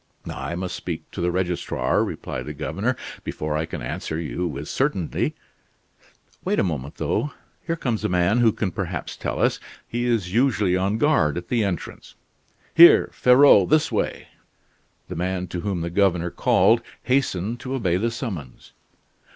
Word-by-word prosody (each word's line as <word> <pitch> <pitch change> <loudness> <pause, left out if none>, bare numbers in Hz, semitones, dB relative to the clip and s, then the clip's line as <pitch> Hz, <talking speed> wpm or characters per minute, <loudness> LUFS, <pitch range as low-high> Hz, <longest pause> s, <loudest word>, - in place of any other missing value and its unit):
"I 85 - -5
must 90 +1 -4
speak - - -6
to - - -5
the 90 - +1
registrar," 90 -7 0
replied - - -5
the 75 - -6
governor, 75 +1 -2 0.3
"before 75 0 -3
I 80 +1 -1
can 80 -7 -6
answer 80 +5 -4
you 85 +2 -3
with 75 -1 -6
certainty. 130 - -1 1.1
Wait - - 0
a - - +3
moment 75 -6 -3
though, 140 +7 -1 0.3
here 165 - 0
comes 120 -8 -2
a - - 0
man 90 +5 +2
who 115 -2 +5
can 100 -3 -2
perhaps - - -4
tell - - -4
us. - - +2 0.3
He 120 +1 -2
is 105 -7 0
usually 110 -7 +2
on 95 +3 0
guard 110 - +2
at 85 0 -6
the 115 -3 +2
entrance. 95 -5 -5 0.6
Here, 170 +1 +8
Ferraud, 125 -6 +6
this 155 +1 +3
way!" - - -2 0.8
The - - -6
man 90 +1 -2
to 90 - -4
whom 95 -3 -2
the 85 +1 -3
governor 90 -2 +2
called - - +3 0.2
hastened 120 -4 0
to 130 +2 -4
obey 90 -9 +1
the 115 +5 0
summons. 100 - -7
95 Hz, 165 wpm, -23 LUFS, 85-120 Hz, 1.1 s, Here